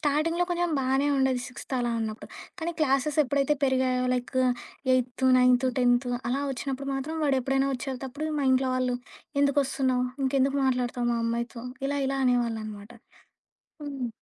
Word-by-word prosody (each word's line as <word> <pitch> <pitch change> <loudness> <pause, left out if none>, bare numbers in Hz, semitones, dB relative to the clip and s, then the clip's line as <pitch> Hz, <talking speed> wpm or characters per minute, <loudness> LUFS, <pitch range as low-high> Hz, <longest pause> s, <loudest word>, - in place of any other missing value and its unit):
స్టార్టింగ్‌లో 310 +4 +1
కొంచెం 350 0 0
బానే 270 +2 +1
ఉండేది 265 -2 +2
సిక్స్త్ 250 +2 -11
అలా 240 -1 0
ఉన్నప్పుడు. 220 -1 -5 0.3
కానీ, 330 +1 -1
క్లాసెస్ 275 +1 +1
ఎప్పుడైతే 280 +2 +1
పెరిగాయో, 255 -1 +1
లైక్ 250 +1 -4 0.6
ఎయితు, 255 +1 0
నైన్తు, 250 +1 +4
టెన్తు 245 0 +3 0.2
అలా 270 +3 0
ఒచ్చినప్పుడు 275 +1 -4
మాత్రం 280 +4 -3
వాడెప్పుడైనా 270 -1 +1
ఒచ్చేటప్పుడు 270 +4 -5
మా - - 0
ఇంట్లో 260 0 +2
వాళ్ళు 255 -1 0 0.5
"ఎందుకొస్తున్నావు? 270 -3 +1 0.2
ఇంకెందుకు 270 +1 +2
మాట్లాడతావు 245 -1 0
మా 235 - 0
అమ్మాయితో? 235 +1 -3 0.2
ఇలా 285 +1 -1
ఇలా 275 0 -1
అనేవాళ్ళు" 240 -3 +1
అనమాట. 210 +1 -9 0.9
హ్మ్. 275 -4 -4
260 Hz, 140 wpm, -27 LUFS, 245-275 Hz, 0.9 s, నైన్తు